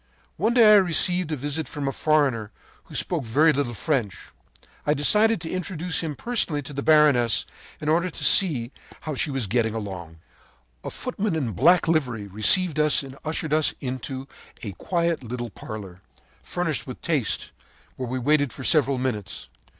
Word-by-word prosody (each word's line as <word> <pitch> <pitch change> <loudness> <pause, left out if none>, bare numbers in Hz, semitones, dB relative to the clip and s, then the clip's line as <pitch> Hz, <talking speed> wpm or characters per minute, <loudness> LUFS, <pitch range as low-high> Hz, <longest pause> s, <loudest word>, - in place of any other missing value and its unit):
“One 220 +8 0
day 225 -3 +7
I - - +8
received 180 -2 +3
a - - 0
visit 145 +3 -3
from 145 -2 -5
a - - 0
foreigner 135 -8 0 0.4
who - - -12
spoke 165 -5 +1
very 150 +8 +3
little 130 -4 -2
French. 120 - -2 0.5
I 150 - +1
decided 210 +9 +3
to 160 - -5
introduce 180 -2 -1
him 155 -3 -4
personally 170 - -1
to 140 - -9
the 140 - -4
baroness, 145 -7 +3 0.3
in 150 - -6
order 170 +4 +2
to - - -6
see 140 -11 +4 0.3
how 155 - -5
she 145 - -1
was 135 -4 -2
getting 110 +2 0
along. 90 -6 -7 0.7
“A - - -5
footman 215 -7 -3
in 135 -8 -2
black 165 - +3
livery 125 -10 0
received 140 - +3
us 150 -1 +3
and 135 -1 -10
ushered 155 -1 -3
us 155 -1 +2
into 130 +1 -6 0.4
a 105 - -4
quiet 170 - -2
little 120 -1 -6
parlor, 95 -3 -9 0.4
furnished - - -3
with - - -8
taste, - - -1 0.4
where 125 - -5
we 130 - -3
waited 145 +1 +1
for 130 - -9
several 140 -2 +2
minutes. 110 - -4
145 Hz, 170 wpm, -24 LUFS, 120-165 Hz, 0.7 s, I